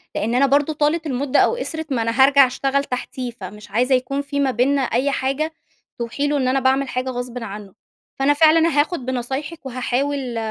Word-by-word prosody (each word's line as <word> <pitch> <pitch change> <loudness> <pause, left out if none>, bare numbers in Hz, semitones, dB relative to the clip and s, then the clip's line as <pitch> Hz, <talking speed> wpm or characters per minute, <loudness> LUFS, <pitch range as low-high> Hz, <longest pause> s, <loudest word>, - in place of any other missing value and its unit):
لإن 230 +3 -1
أنا 275 +2 +4
برضه 285 +3 +2
طالت 305 +2 0
المُدة 265 0 0
أو - - +3
قِصرِت، 320 - -5
ما 235 - 0
أنا 230 +4 +3
هارجع 275 -1 +6
أشتغل 270 +2 -1
تحتيه 250 -1 -5
فمش 205 -1 -11
عايزة 250 +4 +2
يكون 275 +3 -2
في 285 0 -4
ما 275 -2 +2
بيننا 270 +3 +1
أي 260 +3 0
حاجة 275 +5 -1 0.5
توحي 235 +5 -2
له 290 0 0
إن 260 -2 0
أنا 265 +1 +2
باعمل 265 +1 +1
حاجة 255 +1 -2
غصبٍ 245 -1 -5
عنه. 200 -2 -8 0.5
فأنا 280 +2 +4
فعلًا 320 +2 +5
هاخُد 300 -3 0
بنصايحِك 265 +5 -4
وهاحاول 255 0 -2
265 Hz, 190 wpm, -21 LUFS, 245-285 Hz, 0.5 s, هارجع